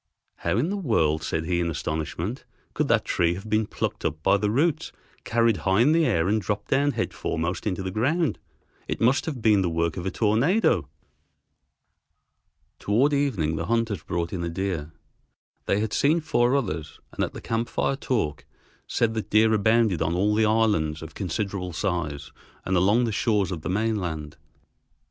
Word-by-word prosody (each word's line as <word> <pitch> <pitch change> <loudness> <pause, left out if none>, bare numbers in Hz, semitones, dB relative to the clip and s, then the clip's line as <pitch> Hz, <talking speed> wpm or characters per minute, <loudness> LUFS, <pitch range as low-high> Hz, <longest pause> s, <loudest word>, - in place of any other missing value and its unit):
"How 85 +4 -1
in 155 +10 +1
the 205 - -1
world," 80 - +1
said 80 +3 -2
he 85 +1 0
in 85 -1 0
astonishment, 80 - -3 0.3
"could - - 0
that - - +2
tree 85 0 +1
have 95 +4 -8
been 110 0 +1
plucked - - -3
up 80 +1 -2
by 100 - +4
the 105 +1 0
roots, 145 +8 +1 0.3
carried 115 -2 +2
high 95 +6 +2
in 140 +5 +5
the 165 0 +3
air, 80 +1 +1
and 110 +2 +1
dropped 100 +2 -3
down 145 +1 +2
head - - -2
foremost 85 +4 -3
into 95 -1 -2
the 95 - -3
ground. 145 - 0 0.5
It - - -3
must 125 +7 +2
have 135 -8 -4
been 105 -3 +5
the 90 - 0
work 85 +1 -1
of 90 +1 -3
a - - +2
tornado." 110 - +2 1.9
Toward 125 +9 +2
evening 105 - 0
the - - -3
hunters 115 -3 0
brought 85 -1 -3
in 90 -3 -3
a 85 - -2
deer. 85 -3 -3 0.8
They 100 - +2
had 110 -1 -2
seen 155 +4 +3
four 140 -5 +2
others, 80 - -3
and - - -1
at - - -3
the - - -7
camp 115 +1 -2
fire 135 - 0
talk 105 - -2 0.4
said 115 -1 +1
that 110 -1 -4
deer 110 +1 +4
abounded 110 -3 +3
on 85 - 0
all 100 +4 +2
the 110 +1 +3
islands 105 -9 +1
of 80 - -9
considerable 95 -1 -3
size 80 -6 -3 0.3
and 95 - 0
along 100 +7 +3
the 115 - 0
shores 105 -2 +1
of 85 -4 -4
the - - -4
mainland. 90 -7 -2
100 Hz, 185 wpm, -25 LUFS, 85-115 Hz, 1.9 s, in